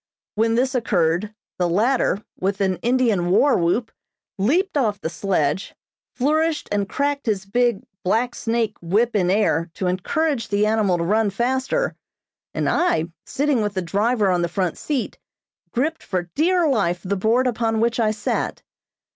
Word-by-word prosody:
When 225 +1 +1
this 255 +2 +1
occurred, 180 -4 +1 0.3
the 175 -1 +1
latter, 215 +2 +1 0.2
with 195 +1 -1
an 190 -2 +1
Indian 235 -8 +1
war 270 +9 +4
whoop, 180 +7 0 0.5
leaped 330 - +1
off 215 -8 +1
the 160 - -4
sledge, 185 -4 -1 0.4
flourished 310 +4 +1
and 205 -1 0
cracked 285 -2 -1
his 200 -3 0
big 240 +1 +1 0.2
"black 235 +6 +1
snake" 225 -3 -1
whip 215 +7 +1
in 180 -3 +2
air 180 -4 +1
to 190 - -3
encourage 230 - 0
the 205 0 +1
animal 210 -4 +2
to 170 - -1
run 210 +4 +2
faster, 260 - -1 0.6
and - - -2
I, 170 - +1 0.2
sitting 285 -3 +1
with 210 -1 -2
the 185 - -1
driver 205 +3 +1
on 180 -1 +1
the 170 - 0
front 180 -1 -1
seat, 285 -5 -3 0.5
gripped 310 +7 -1
for 180 -3 -3
dear 350 +2 +2
life 195 - +1
the 200 +2 -1
board 225 +6 +2
upon 225 -2 0
which 235 +2 +1
I 220 -2 +3
sat. 215 -1 -2
215 Hz, 160 wpm, -22 LUFS, 190-250 Hz, 0.6 s, war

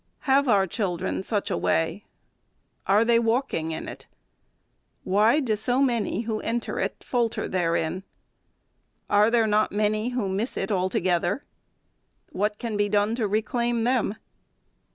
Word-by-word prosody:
Have 275 0 +3
our 200 -5 +4
children 185 -3 -2
such 205 +1 -2
a - - 0
way? 165 +5 0 0.8
Are 205 +4 +4
they 230 0 +4
walking 230 - 0
in 160 - -5
it?. - - -9 1.0
Why 215 +9 +3
do 240 -7 0
so 245 +4 +1
many, 235 -6 +1
who 220 -2 -3
enter 235 +1 -2
it, - - -3
falter 240 -3 -1
therein? 170 -1 -1 1.1
Are 205 +2 +5
there 230 -1 +3
not 215 0 +2
many 215 +2 0
who 245 -5 -2
miss 200 +6 -2
it 195 - -2
altogether? 185 +3 0 0.9
What 210 +2 -1
can 225 -2 -4
be 205 0 +1
done 205 +1 +2
to 230 -3 -1
re 215 +2 0
claim 235 0 -1
them 240 -4 +1
215 Hz, 145 wpm, -25 LUFS, 195-235 Hz, 1.1 s, Are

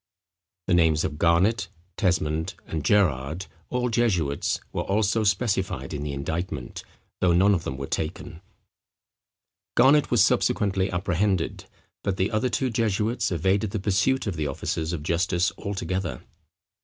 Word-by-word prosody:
The 95 - +1
names 80 -3 +3
of 75 - -3
Garnet, 95 +5 +3 0.3
Tesmond, 80 -4 0
and 80 -3 -4
Gerrard, 80 -3 +1 0.2
all 125 0 0
jesuits, 95 -12 0
were - - -1
also 105 +2 +1
specified 100 -2 0
in 70 - -4
the 75 0 -3
indictment, 75 -1 -4 0.4
though 90 -2 +3
none 95 +4 +5
of 85 -4 -1
them 65 - -4
were 70 - -4
taken. 80 +2 -4 1.3
Garnet 145 +2 +5
was - - +5
subsequently 95 -1 +1
apprehended; 95 0 -1 0.4
but 95 -1 -1
the 95 +1 0
other 110 +4 +1
two 130 +1 0
jesuits 115 +1 0
evaded 95 +5 +1
the 105 - -3
pursuit 105 +7 +1
of 95 -5 -3
the 75 -1 -1
officers 80 +3 -3
of 85 -4 -4
justice 85 +2 +1
altogether. 95 -2 -3
95 Hz, 140 wpm, -25 LUFS, 80-105 Hz, 1.3 s, none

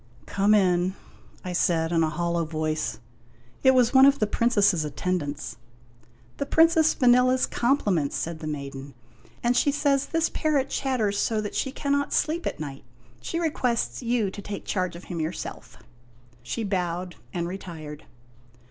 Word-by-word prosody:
" - - -27
Come 205 +2 +3
in," 185 -2 +2 0.5
I 180 - -3
said 165 -2 +1
in 165 -1 +2
a 160 - +2
hollow 170 +2 -1
voice. 155 -5 -2 0.6
It 265 0 +5
was 245 -1 +4
one 265 0 +8
of 280 0 +4
the 215 - +1
Princess's 205 -6 +2
attendants. 145 -5 -3 0.8
"The 280 - -3
Princess 320 0 +4
Vanella's 250 0 +4
compliments," 205 - 0
said 165 -1 -4
the 155 - -6
maiden, 140 -2 -6 0.5
"and 240 +1 +2
she 285 - +3
says 280 -1 +1
this 325 0 +1
parrot 290 -4 0
chatters 225 -7 0
so 220 -2 +1
that 205 - -5
she 265 - -1
cannot 285 +1 -1
sleep 330 +3 0
at - - -4
night. 140 -3 -7 0.4
She 330 - -3
requests 260 -9 -1
you 235 -5 0
to 205 - -8
take 200 +1 -7
charge 185 -3 -2
of 170 - -10
him 175 -2 -6
yourself." 160 +3 -5 0.6
She 225 - -4
bowed 180 -3 -2 0.2
and 170 -1 -2
retired. 160 -5 -8
195 Hz, 155 wpm, -26 LUFS, 165-255 Hz, 0.8 s, one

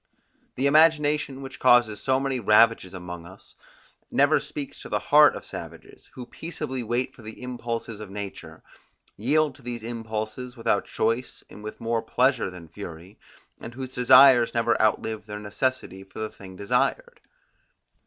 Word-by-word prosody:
The 130 - -1
imagination 150 -2 +3
which 135 - -9
causes 120 -5 +4
so 130 +2 +1
many 135 -1 -2
ravages 110 -2 +4
among 90 -2 -8
us, 95 +2 -15 0.6
never - - +3
speaks 145 -2 -7
to - - -10
the - - 0 0.2
heart 150 0 +8
of - - -8
savages, - - -10
who 125 - -7
peaceably 130 -2 -6
wait 120 +2 -2
for - - -16
the 110 0 -10
impulses 115 -3 -5
of 105 -2 -8
nature, 100 0 -8 0.5
yield 145 +6 +1
to - - -18
these 120 -2 -6
impulses 115 +2 -5
without 115 - 0
choice 115 +3 -2
and 105 - -12
with 105 - -8
more 115 0 -1
pleasure 130 -4 +1
than 90 -2 -11
fury; 85 +2 -10 0.4
and 120 - -9
whose 130 0 -7
desires 125 -1 +6
never 115 0 +2
outlive 110 0 0
their 105 0 -6
necessity 105 -1 -3
for 95 - -17
the 110 0 -3
thing 95 -2 -12
desired. 125 - -1
115 Hz, 155 wpm, -25 LUFS, 105-130 Hz, 0.6 s, heart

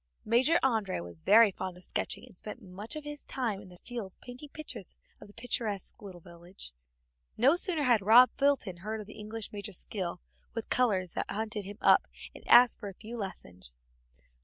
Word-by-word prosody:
Major 255 +9 +4
André 220 - +1
was 85 -2 -10
very 220 0 +7
fond 185 -1 -6
of 180 - -14
sketching, - - -3
and - - -17
spent 210 +5 -7
much 205 +5 -7
of 305 - -5
his 295 -1 -7
time 230 -7 -2
in 195 - -13
the 180 -1 -14
fields 220 -3 -7
painting 250 +4 -9
pictures 285 - -7 0.2
of - - -11
the - - -15
picturesque 225 -4 -2
little 185 -4 -10
village. 170 - -9 0.6
No 265 +8 +5
sooner 350 -4 0
had 240 -5 +4
Rob 230 +6 +7
Fulton 275 -10 +1
heard 215 +5 -4
of - - -9
the 215 - -12
English 215 +1 -6
major's 205 -2 -3
skill 180 -4 -4 0.4
with 230 - -4
colors 195 -8 +2
than - - -1
he - - -4
hunted 215 -1 -3
him 205 +1 -8
up - - +5 0.3
and - - -13
asked 245 -1 +7
for 205 - -5
a 195 - -11
few 225 +4 -9
lessons. 90 - -8
210 Hz, 195 wpm, -30 LUFS, 185-245 Hz, 0.6 s, very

